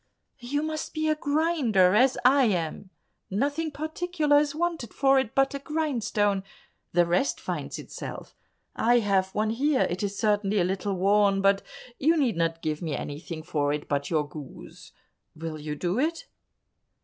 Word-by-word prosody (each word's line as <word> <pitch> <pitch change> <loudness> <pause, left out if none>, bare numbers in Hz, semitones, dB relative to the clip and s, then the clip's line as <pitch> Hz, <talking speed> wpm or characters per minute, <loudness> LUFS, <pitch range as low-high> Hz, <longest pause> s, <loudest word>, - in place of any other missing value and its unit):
"You 280 +4 -2
must 310 0 -4
be 310 0 0
a 310 - +3
grinder, 285 - +2
as 255 +5 +4
I 270 +1 +6
am; 180 -2 -2 0.4
nothing 285 +10 -1
particular 310 0 +1
is 295 -1 -1
wanted 330 - -2
for 270 -1 +4
it 260 -4 -3
but 270 0 +3
a 280 - -3
grindstone, 235 -10 0 0.5
the 175 0 +4
rest 180 +11 +1
finds - - -4
itself. - - -8 0.4
I 240 +2 +3
have 195 -4 +2
one 215 +1 +1
here; 270 +4 +2
it 180 - -3
is 200 -1 -3
certainly 210 -1 +1
a 185 - +3
little 190 +2 -1
worn, 200 +1 +3
but 195 0 +3 0.4
you 325 +4 +3
need 265 -7 +1
not 165 0 -1
give 155 -1 -2
me 160 -4 -2
anything 155 +2 -6
for 145 -2 0
it 150 0 -4
but 140 -1 -1
your 155 -3 0
goose; 145 -2 -11 0.4
will 160 -1 -6
you 150 0 -4
do 180 +8 -1
it?" 330 +4 -1
210 Hz, 165 wpm, -27 LUFS, 175-290 Hz, 0.5 s, I